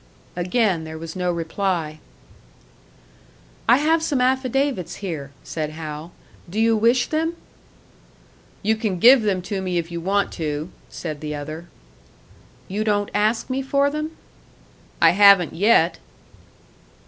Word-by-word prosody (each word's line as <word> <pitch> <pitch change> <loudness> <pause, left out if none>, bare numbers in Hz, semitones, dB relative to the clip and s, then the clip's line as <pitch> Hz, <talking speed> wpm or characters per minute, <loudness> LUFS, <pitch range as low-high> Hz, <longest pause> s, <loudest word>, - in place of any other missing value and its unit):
Again 180 -1 +1
there 160 0 -7
was 165 0 -8
no 180 -1 0
reply. 165 -2 -2 1.7
"I 240 - +7
have 320 +3 +2
some 290 -4 0
affidavits 260 - 0
here," 160 -8 -5
said 155 -2 -4
Hal. 155 +1 -7 0.4
"Do 205 +5 -3
you 225 0 +4
wish 235 +3 +3
them?" 325 +2 -1 1.3
"You 220 +2 +2
can 215 -5 -2
give 245 +7 +7
them 195 -4 0
to 195 0 -3
me 180 -2 -2
if 170 0 -3
you 170 0 -4
want 195 +3 0
to," 155 +1 -4 0.2
said 155 -3 -6
the 150 -1 -4
other. 155 +4 -7 1.0
"You 205 +3 -2
don't 205 -1 0
ask 215 +2 +1
me 260 +1 -2
for 280 +1 +1
them?" 305 +2 -4 0.8
"I - - +6
haven't 200 -3 +6
yet." 175 -3 +3
195 Hz, 135 wpm, -22 LUFS, 165-240 Hz, 1.7 s, I